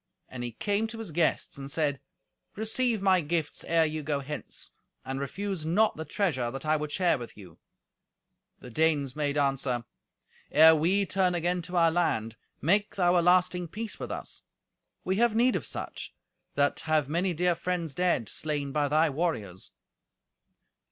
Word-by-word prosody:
And 125 -1 -6
he 120 -1 -4
came 205 - 0
to 225 +1 -8
his 225 -6 -6
guests, 160 -3 0
and 135 0 -6
said, 145 -2 -1 0.5
"Receive 220 0 0
my 190 -2 +4
gifts 160 -1 -2
ere 165 -1 +3
you 155 0 -3
go 145 -1 -1
hence, 150 +2 -6 0.3
and 135 +1 -3
refuse 190 +5 -4
not 195 +8 +2
the 160 - -6
treasure 150 - 0
that 135 +4 -7
I 155 0 +3
would 150 -1 -3
share 175 -4 +2
with 120 -3 -9
you." 90 -6 -13 1.0
The 125 - -10
Danes 145 -2 +1
made 145 -1 -1
answer, 135 -4 0 0.6
"Ere 160 +1 +8
we 185 +6 +2
turn 185 -1 +1
again 175 +1 0
to 180 +1 -4
our 165 -1 +5
land, 115 -10 0 0.3
make 200 +7 +2
thou 180 -2 +3
a 175 - +5
lasting 180 0 +3
peace 215 +6 -6
with - - -5
us. - - -5 0.6
We 190 +1 0
have 235 -1 +3
need 245 +3 +3
of - - -3
such, - - -6 0.4
that 140 0 +2
have 155 -3 +1
many 175 +5 0
dear 180 +2 +2
friends 170 -2 -3
dead, 175 - +1
slain 145 0 -3
by 145 0 +1
thy 155 +3 +3
warriors." 115 - -3
160 Hz, 170 wpm, -28 LUFS, 140-180 Hz, 1.0 s, Ere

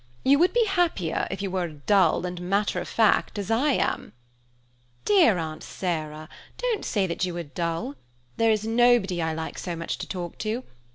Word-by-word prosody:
You 280 +2 +5
would 360 +2 +4
be 475 +1 +3
happier 345 - 0
if 195 +1 -4
you 195 - -2
were 185 -1 0
as 160 -3 -8
dull 190 -4 +3
and 180 -1 -4
as - - -7
matter 200 +3 0
of - - -6
fact 220 -1 +2
as 200 +1 -3
I 270 +6 +3
am." - - -1 0.9
"Dear 355 - +5
Aunt 160 -2 -4
Sarah, 155 -4 -4 0.3
don't 485 -4 -1
say 200 -4 0
you 180 -1 -1
are 170 - -3
dull. 165 -1 -3 0.4
There 225 0 +3
is 215 0 0
nobody 225 -6 +3
I 160 -1 -1
like 160 0 -5
so 175 -2 -4
much 165 0 -4
to - - -5
talk 175 -3 -6
to. 225 +4 -2
195 Hz, 190 wpm, -26 LUFS, 170-230 Hz, 0.9 s, You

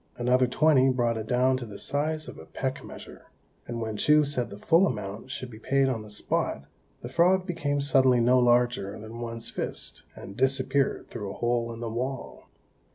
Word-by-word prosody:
Another 125 +1 +3
twenty 135 0 +4
brought 120 -2 +1
it 110 -1 -5
down 130 +2 +2
to 125 - -6
the 100 -2 -9
size 155 +2 -2
of - - -9
a 80 - -12
peck 130 0 -4
measure; - - -11 0.4
and 120 -1 -4
when 110 -2 -3
Chou 150 +6 +5
said 140 -4 -1
the 100 - -9
full 165 - +4
amount 105 - -5
should 130 -1 -6
be 110 - -11
paid 135 +2 +2
on 120 -4 -2
the 105 - -11
spot, 105 - -1 0.4
the - - -4
frog 185 +2 +3
became 145 -6 -1
suddenly 130 -3 +4
no 125 +2 +4
larger 120 -4 +2
than 110 +2 -9
one's 115 -1 -5
fist, - - -3
and 100 - -10
disappeared 135 +2 +1
through 105 -4 -6
a - - -6
hole 120 -1 0
in 115 0 -8
the 120 - -3
wall. 130 +3 -5
125 Hz, 195 wpm, -27 LUFS, 115-135 Hz, 0.4 s, Chou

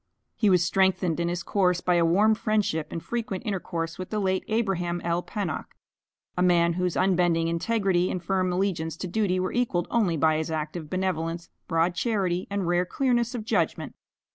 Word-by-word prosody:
He 215 - +2
was 180 -2 +4
strengthened 185 -2 +1
in 170 - 0
his 175 0 -3
course 180 -2 +1
by 180 - +1
a 170 -1 +3
warm 205 +6 +4
friendship 210 -8 0
and 165 - -5
frequent 230 -3 -4
intercourse 175 -5 -3
with 185 - -5
the 215 - -2
late 190 -2 0
Abraham 195 -6 0
L. 170 +1 0
Pennock, 190 -5 -5 0.6
a 180 - -1
man 170 -1 +4
whose 180 0 -1
unbending 175 -3 +2
integrity 185 +1 +1
and 185 - -2
firm 185 0 0
allegiance 180 -4 -1
to 185 - -4
duty 185 -1 0
were 185 - -2
equalled 225 -8 0
only 200 -9 +2
by 155 +1 +3
his 160 0 -2
active 155 0 -4
benevolence, 170 -2 -2 0.2
broad 165 +2 +1
charity, 185 -3 -1
and 200 -2 -2
rare 175 +1 +2
clearness 240 +2 0
of 220 -3 -5
judgment. - - -1
180 Hz, 180 wpm, -26 LUFS, 170-200 Hz, 0.6 s, was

